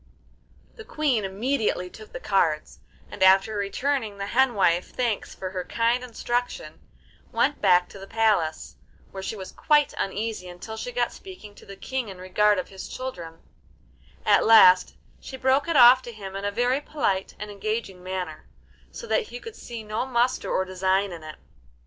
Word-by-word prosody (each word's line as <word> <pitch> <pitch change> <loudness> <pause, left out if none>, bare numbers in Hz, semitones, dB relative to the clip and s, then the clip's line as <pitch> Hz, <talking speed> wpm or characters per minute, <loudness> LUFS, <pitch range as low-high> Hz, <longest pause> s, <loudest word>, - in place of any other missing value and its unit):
The 445 - -9
Queen 290 - 0
immediately 210 -1 -1
took 215 +4 -13
the - - -7
cards, 165 -9 0 0.3
and, - - -10
after 195 +3 +5
returning 215 +2 -2
the 200 - -4
hen 250 +3 +2
wife 180 -3 +2
thanks 235 -5 -2
for 185 -1 -6
her 185 -1 -3
kind 235 +4 0
instruction, 245 - -3 0.5
went 290 - +1
back 180 0 +4
to 195 - -12
the 195 - -10
palace, 210 -8 0 0.3
where 190 - -7
she 205 - -4
was 190 -2 -8
quite 295 -1 +2
uneasy 205 -1 -3
until 180 +5 -8
she - - -5
got - - -1
speaking 370 - -12
to - - -17
the 200 - -9
King 260 0 -4
in 190 - -9
regard 205 +3 +2
of 185 - -4
his 190 -1 -8
children; 175 -11 -7 0.8
at - - +5
last 185 -5 +7 0.2
she 265 - -9
broke 265 +3 +2
it 335 -3 +1
off 250 +1 +8
to 240 - -9
him 195 -3 -9
in 195 +1 -4
a 205 - 0
very 245 +6 +1
polite 200 -11 -2
and 210 0 -7
engaging 205 -2 -4
manner, 180 -4 -5 0.4
so - - -9
that 470 -1 0
he 245 - -8
could 455 - -10
see 235 -2 -8
no 215 +2 -2
muster 245 0 0
or 190 - 0
design 190 +1 0
in 170 -2 -8
it. 155 -1 -9
210 Hz, 180 wpm, -25 LUFS, 190-250 Hz, 0.8 s, off